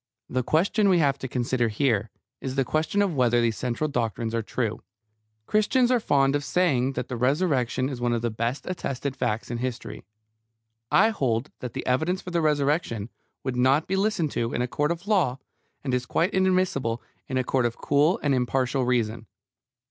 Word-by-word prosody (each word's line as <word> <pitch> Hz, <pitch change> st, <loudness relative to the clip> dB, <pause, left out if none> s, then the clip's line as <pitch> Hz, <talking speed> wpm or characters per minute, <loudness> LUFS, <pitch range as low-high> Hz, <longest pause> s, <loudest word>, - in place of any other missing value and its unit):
The 130 Hz, -, -1 dB
question 195 Hz, -, +2 dB
we 185 Hz, -, +5 dB
have 140 Hz, -4 st, +2 dB
to 130 Hz, -, -4 dB
consider 120 Hz, -1 st, 0 dB
here 110 Hz, -2 st, 0 dB, 0.3 s
is 130 Hz, -1 st, -4 dB
the 135 Hz, -1 st, +1 dB
question 160 Hz, +9 st, +1 dB
of 195 Hz, -4 st, 0 dB
whether 120 Hz, -3 st, +3 dB
these 115 Hz, -1 st, +1 dB
central 125 Hz, +6 st, -2 dB
doctrines 115 Hz, -4 st, -2 dB
are 115 Hz, -, 0 dB
true. 110 Hz, 0 st, -3 dB, 0.6 s
Christians 240 Hz, -, +2 dB
are 250 Hz, -, +4 dB
fond 140 Hz, -8 st, +2 dB
of 145 Hz, -, -1 dB
saying 135 Hz, -2 st, +1 dB
that -, -, -3 dB
the 125 Hz, -, -4 dB
Resurrection 130 Hz, -1 st, +1 dB
is 130 Hz, -3 st, -5 dB
one 120 Hz, 0 st, +1 dB
of 120 Hz, -1 st, -1 dB
the 120 Hz, -, 0 dB
best 115 Hz, +5 st, -2 dB
attested 140 Hz, -6 st, -3 dB
facts 115 Hz, -2 st, -2 dB
in 120 Hz, -, -3 dB
history. 120 Hz, -4 st, -5 dB, 0.9 s
I 220 Hz, +3 st, +5 dB
hold 130 Hz, -, -1 dB
that 125 Hz, -2 st, -6 dB
the -, -, -5 dB
evidence 160 Hz, +9 st, +1 dB
for 180 Hz, -, -8 dB
the 170 Hz, -1 st, +1 dB
Resurrection 145 Hz, -, 0 dB, 0.3 s
would 130 Hz, -2 st, -2 dB
not 130 Hz, +5 st, +3 dB
be 190 Hz, -, -1 dB
listened 195 Hz, -6 st, 0 dB
to 115 Hz, 0 st, -2 dB
in 120 Hz, -, 0 dB
a -, -, -1 dB
court 145 Hz, +4 st, 0 dB
of 170 Hz, +2 st, -4 dB
law, 175 Hz, -, +2 dB, 0.5 s
and 130 Hz, -3 st, -2 dB
is 125 Hz, 0 st, -1 dB
quite 175 Hz, +4 st, +1 dB
inadmissible 185 Hz, -11 st, +1 dB, 0.3 s
in 130 Hz, -, -2 dB
a 130 Hz, -, +2 dB
court 125 Hz, -1 st, +1 dB
of 115 Hz, -, -7 dB
cool 150 Hz, +6 st, +2 dB
and 145 Hz, -2 st, +2 dB
impartial 130 Hz, +1 st, +1 dB
reason. 115 Hz, -3 st, 0 dB
130 Hz, 195 wpm, -26 LUFS, 120-160 Hz, 0.9 s, we